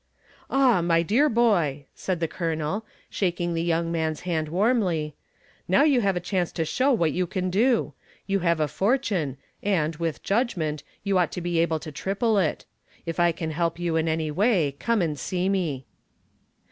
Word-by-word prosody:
"Ah, 260 -8 +4
my 165 -1 +2
dear 255 - +3
boy," 175 - +2
said 185 -3 -3
the 165 - 0
Colonel, 165 +4 -2 0.2
shaking 175 -2 -1
the 165 - -1
young 165 0 0
man's 160 -2 -1
hand 160 -4 -2
warmly, 180 -5 +1 0.5
"now 280 - +4
you 280 -5 +4
have 195 -3 +1
a - - 0
chance 180 -1 -1
to 165 - -1
show 260 - +1
what 170 - +2
you 180 +3 -1
can 185 +1 -2
do. 230 +5 +2 0.3
You 195 0 0
have 170 -2 +1
a 155 - +2
fortune 195 - 0 0.2
and, 165 -6 0
with 165 -2 -3
judgment, 180 - 0 0.2
you 195 -2 +2
ought 175 - +1
to - - -3
be 175 -1 0
able 165 -1 +2
to 155 - -7
triple 200 - 0
it. 165 -5 -1 0.4
If 165 0 -4
I 175 0 +4
can 160 -1 -4
help 165 +1 -1
you 170 -2 -1
in 160 0 +1
any 160 -1 -1
way, 175 - +2
come 230 -5 +1
and 150 -4 -2
see 180 +6 -1
me." 165 -10 -1
175 Hz, 185 wpm, -25 LUFS, 160-200 Hz, 0.5 s, Ah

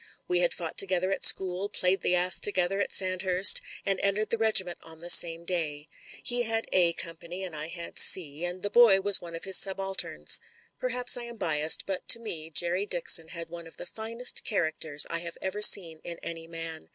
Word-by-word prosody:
We 180 0 -2
had 175 -1 -1
fought 165 -2 -5
together 185 -1 0
at - - -5
school, 190 +1 +3
played 185 0 -2
the 180 - -2
ass 180 0 +3
together 195 -1 0
at 200 - -4
Sandhurst, 185 0 +3 0.2
and 195 -1 -3
entered 200 +2 -3
the 230 - -2
regiment 205 -6 +1
on 160 0 -11
the 175 +2 -1
same 170 0 +5
day. 155 -4 -6 0.3
He 245 0 -1
had 225 -1 -2
"A 175 -2 +2
company 170 +3 -9
and 180 -4 -9
I 155 +1 -6
had 170 0 -7
*'C," 155 -3 +5
and 180 +1 -7
the 205 - -5
boy 230 -5 +4
was 200 0 +2
one 170 -1 -11
of 165 - -11
his 190 -1 +3
subalterns. 195 0 +1 0.4
Perhaps 250 0 +1
I 240 - -3
am 235 -1 -11
biassed, 155 -4 +1
but 195 -2 -7
to 230 - +4
me 165 -9 -7
Jerry 175 +5 0
Dixon 165 -3 +2
had 170 -1 -9
one 170 0 -12
of 165 - -10
the - - -9
finest 230 +5 -3
characters 160 -7 -2
I 170 - -3
have 170 0 -9
ever 190 +2 -7
seen 170 -6 +4
in 170 -1 -10
any 165 -1 -9
man. 165 -1 -9
180 Hz, 205 wpm, -25 LUFS, 165-195 Hz, 0.4 s, same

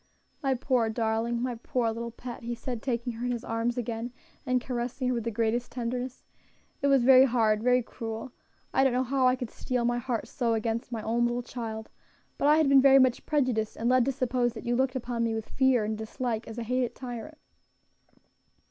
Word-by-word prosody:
"My 270 -3 +1
poor 245 -2 +1
darling! 225 +1 -1
my 250 -1 -1
poor 235 0 -1
little 235 +1 -4
pet!" 240 +1 -8
he 240 0 -4
said, 240 -1 -5
taking 240 -1 -2
her 230 +2 -5
in - - 0
his 240 -1 -3
arms 230 +1 -1
again, 235 0 -3 0.4
and 255 0 +3
caressing 250 +1 -3
her - - +1
with 235 -2 -2
the - - 0
greatest 230 +2 -1
tenderness, 250 +1 -4 0.6
"it 280 - +2
was 275 -3 +4
very 260 +1 +8
hard, 220 -4 +2
very 250 +1 +3
cruel. 225 +2 -6 0.4
I 265 - +4
don't 265 -2 +3
know 255 +1 +2
how 260 0 +2
I 255 - +4
could 245 -3 -6
steel 250 -2 -2
my 240 0 +1
heart 240 -2 -3
so 235 -3 0
against 225 +2 -2
my 225 -2 -4
own 235 +2 +1
little 240 +1 -2
child; 220 -3 -6 0.5
but 285 - +2
I 300 +1 +6
had 315 -2 +4
been 275 -1 +7
very 270 0 +7
much 255 -2 +3
prejudiced, 255 -8 0
and 235 +2 0
led 255 -1 +5
to 275 - +1
suppose 250 -2 0
that 220 - -9
you 240 0 +1
looked 260 +1 +1
upon 240 -2 -2
me 225 -1 0
with 220 -1 -5
fear 260 -4 +3
and 215 +1 -2
dislike, 225 +1 -3
as 225 - -8
a 235 - -3
hated 250 +1 -1
tyrant." 255 +4 -7
240 Hz, 215 wpm, -28 LUFS, 230-255 Hz, 0.6 s, very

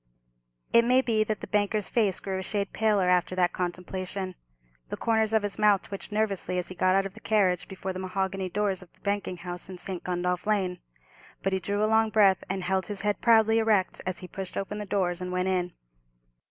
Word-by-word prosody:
It 235 - +7
may 250 +2 +4
be 220 -3 +2
that 215 -1 -2
the - - -6
banker's 210 0 +1
face 210 -6 +1
grew 190 -1 -3
a - - -3
shade 200 +1 -2
paler 210 -4 +2
after 180 0 +2
that 180 -1 +2
contemplation. 185 +1 -4 0.6
The - - -4
corners 220 -1 +1
of 220 -1 +2
his 205 -1 -3
mouth 210 -2 +4
twitched 195 +1 -8
nervously 205 -4 -1
as 180 - -2
he - - -6
got 185 +1 +2
out 195 0 +3
of 195 - -6
the 220 - -12
carriage 195 -5 +1
before 190 0 -5
the 185 - -5
mahogany 190 0 -2
doors 195 0 -1
of 185 - -14
the - - -29
banking 200 -2 -2
house 175 +1 -7
in 185 - -7
St. 180 0 -5
Gundolph 180 +1 -1
Lane. 190 -4 +1 0.6
But 195 - 0
he 190 - +1
drew 205 +3 -1
a - - +5
long 220 0 +3
breath, 200 -3 +4
and 190 0 -2
held 190 0 0
his 205 -2 -4
head 205 0 0
proudly 225 -1 +5
erect 215 -4 +2
as 185 - -2
he 180 - -7
pushed 190 0 -6
open 205 +2 -3
the 210 - -5
doors 185 -3 0
and 180 0 -4
went 180 +1 0
in. 180 -1 0
195 Hz, 220 wpm, -27 LUFS, 185-210 Hz, 0.6 s, It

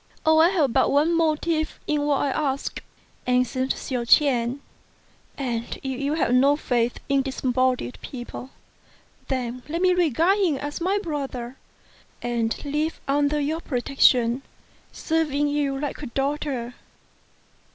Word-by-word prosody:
"I 315 +1 +6
have 310 -10 +1
but - - +3
one 300 +4 +3
motive 315 0 0
in 300 -1 0
what 285 -2 +2
I 280 - 0
ask," 275 -1 -2 0.5
answered 250 +1 +1
Hsiao 250 -3 -3
ch'ien, 245 0 +3 0.8
"and 240 -4 -3
if 265 0 -3
you 285 +2 0
have 285 -6 +1
no 275 +3 +5
faith 245 -5 0
in 275 0 +3
disembodied 255 - -1
people, 250 0 -8 0.8
then 255 -2 -3
let 335 +2 -2
me 365 0 +4
regard 350 - +2
him 355 -7 +2
as 290 +4 -5
my 380 +4 +1
brother, 275 - -4 0.6
and 235 +1 -2
live 300 +3 -1
under 290 +1 +2
your 310 +3 -1
protection, 250 -2 +2 0.5
serving 300 -3 0
you 285 -2 0
like 290 0 -4
a 285 - -5
daughter." 270 -1 -2
280 Hz, 130 wpm, -24 LUFS, 250-305 Hz, 0.8 s, I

